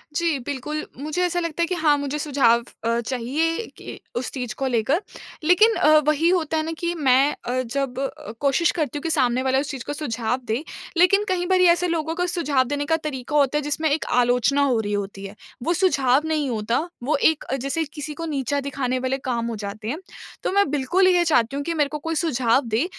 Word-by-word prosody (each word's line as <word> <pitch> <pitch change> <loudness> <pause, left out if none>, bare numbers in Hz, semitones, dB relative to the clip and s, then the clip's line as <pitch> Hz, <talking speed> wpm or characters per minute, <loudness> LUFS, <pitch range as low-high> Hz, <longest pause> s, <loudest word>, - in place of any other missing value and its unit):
जी, 335 -3 +1
बिल्कुल। 285 +4 -4
मुझे 305 +6 -3
ऐसा 355 0 0
लगता 335 -1 -3
है - - +4
कि 365 - -1
हाँ 310 -4 +3
मुझे 285 +1 -3
सुझाव 260 -6 +3 0.2
अ, 230 +1 +1
चाहिए 270 - -1
कि - - -9 0.2
उस 245 +1 -2
चीज़ 250 -4 -4
को 270 - -1
लेकर। 255 - +1 0.4
लेकिन, 400 +7 +5
अ, 310 +1 +5
वही 310 +3 +3
होता 325 -3 +1
है 310 - 0
ना 325 - -3
कि 345 0 -1
मैं 265 -5 +3 0.3
अ, 255 +1 0
जब 260 +1 -3
अ, 270 -5 -5
कोशिश 285 +4 +2
करती 300 -4 -2
हूँ 290 - -5
कि 330 - -1
सामने 255 -5 +2
वाला 265 0 +2
उस 275 - -3
चीज़ 260 -4 -6
को 290 - -3
सुझाव 245 -4 -2
दे, 235 +4 -2 0.3
लेकिन 380 +4 +5
कई 355 -1 0
बारी 365 0 +4
ऐसे 355 +1 -1
लोगों 325 -1 -1
का 360 - 0
सुझाव 300 -7 +1
देने 290 +1 -2
का 320 +2 +2
तरीका 295 -3 -5
होता 290 0 +3
है - - 0
जिसमें 295 +2 -1
एक 300 +2 0 0.2
आलोचना 250 +3 +2
हो 255 -5 +2
रही 205 -1 -2
होती 200 -1 -4
है। 195 +1 -9 0.3
वो 340 +6 +1
सुझाव 280 -7 +3
नहीं 305 -4 0
होता, 225 +1 0 0.2
वो 290 +5 +1 0.2
एक 315 - -8
अ, 265 - -3
जैसे 275 +5 -2
किसी 300 -1 -6
को 330 +2 -6
नीचा 285 -2 -1
दिखाने 255 -2 -1
वाले 260 +1 -1
काम 235 -1 -1
हो 230 - -3
जाते 215 +2 -7
हैं। 300 +8 -3 0.4
तो - - 0
मैं 400 -4 +3
बिल्कुल 345 +7 +2
ये 355 -1 +4
चाहती 270 -5 +2
हूँ 285 - -2
कि 335 - -1
मेरे 295 -3 +1
को 300 - -4
कोई 325 +2 -3
सुझाव 265 -6 +2
दें 225 +7 +1
285 Hz, 225 wpm, -23 LUFS, 250-325 Hz, 0.4 s, लेकिन